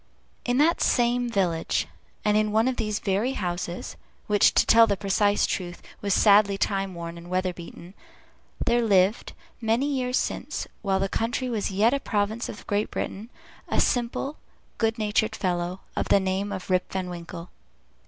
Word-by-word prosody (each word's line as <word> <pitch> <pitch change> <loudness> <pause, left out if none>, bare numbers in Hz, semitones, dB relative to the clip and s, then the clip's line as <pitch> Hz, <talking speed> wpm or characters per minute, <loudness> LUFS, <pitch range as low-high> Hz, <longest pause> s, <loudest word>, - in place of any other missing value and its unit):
In 245 0 +1
that 315 +4 +3
same 240 0 +2
village, 180 -7 0 0.4
and 210 0 +3
in 215 0 +2
one 220 +3 +3
of 260 -1 -1
these 215 -1 -1
very 205 +7 0
houses 175 -4 -4 0.3
(which, 205 -1 +4
to - - +5
tell 230 0 +7
the 200 -2 0
precise 205 +1 +2
truth, 175 -2 -4 0.2
was 200 - -2
sadly 200 0 +5
time 195 -2 -1
worn 170 0 -6
and 170 +1 -12
weather 185 0 0
beaten), 170 +1 -11 0.7
there 240 0 +3
lived, 200 -1 +2 0.3
many 225 +4 +1
years 255 -3 0
since, - - -3 0.2
while 195 -2 +1
the 195 - 0
country 240 +5 -2
was 220 -4 -1
yet 210 +5 +3
a 280 - +1
province 215 0 -1
of - - -9
Great 205 +1 0
Britain, 215 +4 -5 0.4
a - - 0
simple, 245 +4 0 0.4
good 225 0 +1
natured 215 0 0
fellow, 180 0 -2
of - - -1
the - - +5
name 190 +1 -1
of 190 -1 -5
Rip 185 0 +1
Van 190 -1 -2
Winkle. 170 0 -8
205 Hz, 170 wpm, -26 LUFS, 185-230 Hz, 0.7 s, tell